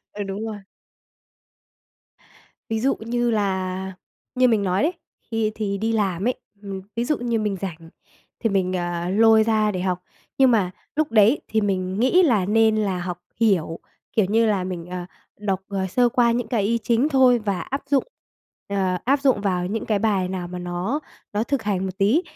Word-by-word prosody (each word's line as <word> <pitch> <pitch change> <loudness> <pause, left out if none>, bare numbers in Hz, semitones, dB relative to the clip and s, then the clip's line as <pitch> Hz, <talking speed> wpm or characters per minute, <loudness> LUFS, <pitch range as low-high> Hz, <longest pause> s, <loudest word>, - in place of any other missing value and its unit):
Ừ, 205 - -4
đúng 200 +3 -4
rồi. 215 -2 -4 2.1
Ví 220 0 0
dụ 270 +3 +2
như 240 +1 0
là, 190 -2 -1 0.4
như 255 0 +4
mình 220 -3 +2
nói 185 +4 +1
đấy, 330 +4 +2 0.4
khi 220 -1 0
thì 200 -2 -2
đi 225 +2 0
làm 195 -2 0
ấy, 255 - +1 0.3
ừm, 195 -1 -5 0.2
ví 235 - 0
dụ 300 +4 +1
như 235 -1 -1
mình 210 -2 -1
rảnh 165 -4 -6 0.5
thì 225 - +1
mình, 185 -2 +1
ờ, 175 -1 -2
lôi 220 +2 +5
ra 215 -1 +2
để 185 -2 -3
học. 185 -1 0 0.4
Nhưng 265 -1 +6
mà 200 -6 +2 0.3
lúc 310 -1 +1
đấy 225 +5 +5
thì 220 0 +1
mình 190 -1 -1
nghĩ 305 +10 +5
là 220 - +3
nên 220 +1 +4
là 195 -4 0
học 175 0 -4 0.2
hiểu, 180 -7 +2 0.3
kiểu 215 -4 +2
như 225 +3 +3
là, 200 -4 +1
mình, 175 -2 -5
ờ, 180 0 -5 0.3
đọc, 195 -2 -1
ờ, 195 -1 -2
sơ 245 +6 +3
qua 235 -1 +3
những 235 -1 -2
cái 230 -5 +1
ý 230 +3 +1
chính 240 +5 +2
thôi 260 -4 +5
và 200 -4 -2
áp 275 +1 -4
dụng, 280 -1 +2 0.6
ờ, 190 -2 0
áp 275 +3 +2
dụng 265 -7 +3
vào 180 -3 0
những 220 +3 -3
cái 210 -2 +1
bài 195 -4 +1
nào 180 -2 -4
mà 180 0 -6
nó 180 +10 -2 0.3
nó 210 +1 0
thực 275 -2 -1
hành 195 -2 -1
một 190 +2 -7
tí. 225 - +3
210 Hz, 195 wpm, -23 LUFS, 185-230 Hz, 2.1 s, Nhưng